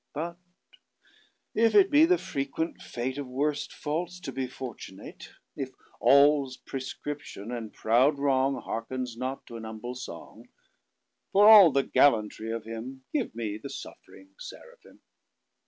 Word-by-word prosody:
But 170 +3 -4 1.1
if 225 +1 +3
it 395 -1 +6
be 300 +2 +7
the 360 +2 +3
frequent 140 - -4
fateOf 130 +4 -4
worst 145 +3 -2
faults 170 +4 -4
to - - -5
be 130 -1 -3
fortunate; 120 -7 -9 0.3
If 135 -2 -4 0.3
all's 140 -2 +4
præscription; 135 -4 -7
and 110 -3 -6
proud 125 +7 +3
wrongHearkens 130 -3 -1
not 130 +3 -5
to 115 - -9
an 115 - -9
humble 110 +2 -6
song; 125 0 -10 0.8
For 205 +2 +7
all 205 -7 +10
the 140 0 +2
gallantry 110 -5 +2
of 115 -1 -4
him, 115 +4 -8
Give 280 - -1
me 110 -2 -4
the 140 - -7
suffring 280 - -11
Seraphim. - - -13
135 Hz, 130 wpm, -28 LUFS, 120-150 Hz, 1.1 s, all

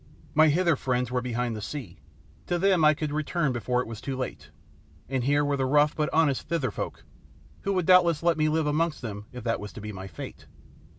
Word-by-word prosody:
My 155 +1 +6
Hither 170 +2 +3
friends 125 -2 -1
were 125 0 0
behind 120 -1 -2
the 105 - -6
sea; 105 - -7 0.5
to 175 - +1
them 185 -2 +3
I 155 0 +6
could 150 0 -3
return 155 0 0
before 125 +1 0
it - - -6
was 110 -1 -7
too 135 0 -4
late, 75 - -5 0.6
and 130 -2 -1
here 145 +1 +3
were 145 -1 0
the 130 -1 0
rough 150 +2 +3
but 150 -1 0
honest 155 -4 +2
Thither 155 -9 0
folk, - - -5 0.6
who 200 - -1
would 185 -3 0
doubtless 175 -3 +5
let 170 -1 +3
me 155 0 +2
live 160 0 +1
amongst 150 0 0
them 105 -2 -6
if 125 -2 -8
that 115 -1 0
was 105 0 -7
to - - -8
be 105 0 -6
my 95 -1 -7
fate. 80 - -9
140 Hz, 225 wpm, -27 LUFS, 120-155 Hz, 0.6 s, My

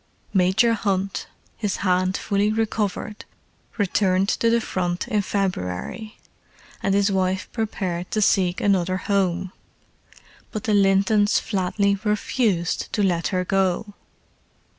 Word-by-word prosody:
Major 190 +5 +3
Hunt, 195 -3 -1 0.3
his 205 -3 -1
hand 185 0 +2
fully 205 +1 0
recovered, 215 -1 -2 0.5
returned 195 -1 +2
to 230 - +2
the 235 0 +3
Front 175 -5 -2
in 210 -1 +1
February, 195 - -3 0.6
and 195 0 +1
his 200 0 +3
wife 185 -1 0
prepared 185 -6 -3
to 215 - -1
seek 185 -3 +2
another 185 -2 +2
home. 190 -2 0 1.0
But 215 - -4
the 220 -4 0
Lintons 200 +1 +3
flatly 200 0 0
refused 210 -4 0
to 210 - +1
let 175 -3 +1
her 180 -1 -1
go. 195 +2 0
195 Hz, 120 wpm, -23 LUFS, 185-210 Hz, 1.0 s, Major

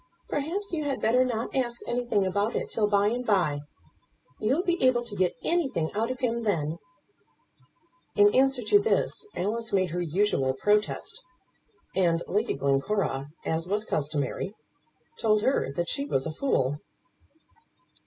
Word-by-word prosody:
Perhaps 350 +8 -2
you 310 -2 0
had 280 -2 -1
better 245 +4 +3
not 235 -1 -3
ask 240 -3 0
anything 240 -4 0
about 200 +4 0
it - - -2
till 215 -2 +2
by 205 0 +3
and 245 +2 -2
by. 180 -10 +2 0.8
You'll 265 +11 +1
be 350 -1 0
able 250 -2 +4
to 235 -4 -7
get 185 -2 +1
anything 270 - 0
out 225 +3 0
of 255 0 -4
him 235 -2 0
then." 165 -7 -1 1.4
In 205 0 +6
answer 265 -1 +3
to 410 - +5
this 425 0 0
Alice 225 +4 -2
made 185 -3 +1
her 175 +1 -2
usual 165 -6 +1
protest, 210 - 0 0.7
and 170 -3 +2
Lady 210 +4 0
Glencora, 140 +1 0 0.2
as 160 +1 -1
was 210 +3 0
customary, 150 +6 -2 0.6
told 215 -1 +2
her 265 - +1
that 170 +4 -2
she 280 -1 -2
was 135 - 0
a 160 - -3
fool. 145 - 0
210 Hz, 150 wpm, -27 LUFS, 175-255 Hz, 1.4 s, In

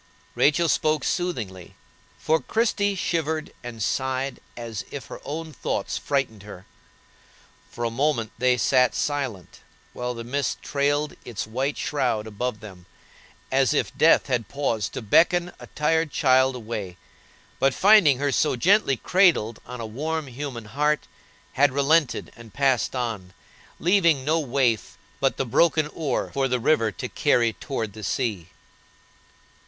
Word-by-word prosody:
Rachel 160 +4 +3
spoke 155 -2 +1
soothingly, 115 - -3 0.4
for 160 +1 +1
Christie 205 -3 0
shivered 160 -3 -2
and 115 -3 -5
sighed 130 +1 -1 0.2
as 115 -3 -5
if 140 - -7
her - - -9
own 160 +1 -6
thoughts - - -3
frightened 130 -7 -1
her. 100 -2 -11 1.0
For 120 - -6
a 115 - 0
moment 120 -3 0
they 125 0 +3
sat 125 +2 +3
silent, 135 - -3 0.3
while 125 0 -4
the 115 - -6
mist 135 +3 -2
trailed 145 +1 0
its 120 -4 -5
white 130 +6 -2
shroud 115 -7 -1
above 110 +1 -4
them, 95 -4 -12 0.6
as 135 +2 +3
if - - -1
death 165 - +5
had 125 -4 -1
paused 115 -7 -2
to - - -5
beckon 175 - +3
a - - -11
tired 160 +1 0
child 130 0 +3
away, 105 -6 -6 0.6
but, 135 +1 +3
finding 185 -5 +5
her 145 +1 0
so 150 +1 +2
gently 175 - +3
cradled 165 - +2
on 125 -1 -7
a 115 - -4
warm, 155 +8 -3
human 130 -3 -6
heart, 150 +6 0 0.5
had 145 0 +4
relented 140 -1 +1
and 115 -3 -14
passed 135 -2 +1
on, 110 -7 -4 0.5
leaving 170 -7 +3
no 160 +2 +2
waif 125 -6 0 0.2
but 135 - +1
the 135 - -1
broken 155 +5 +3
oar 150 -5 -2
for 135 -1 +1
the 125 -1 0
river 115 -3 +2
to - - -6
carry 115 -2 +2
toward 110 -6 -4
the 110 0 -10
sea. 100 -6 -2
130 Hz, 145 wpm, -24 LUFS, 115-150 Hz, 1.0 s, death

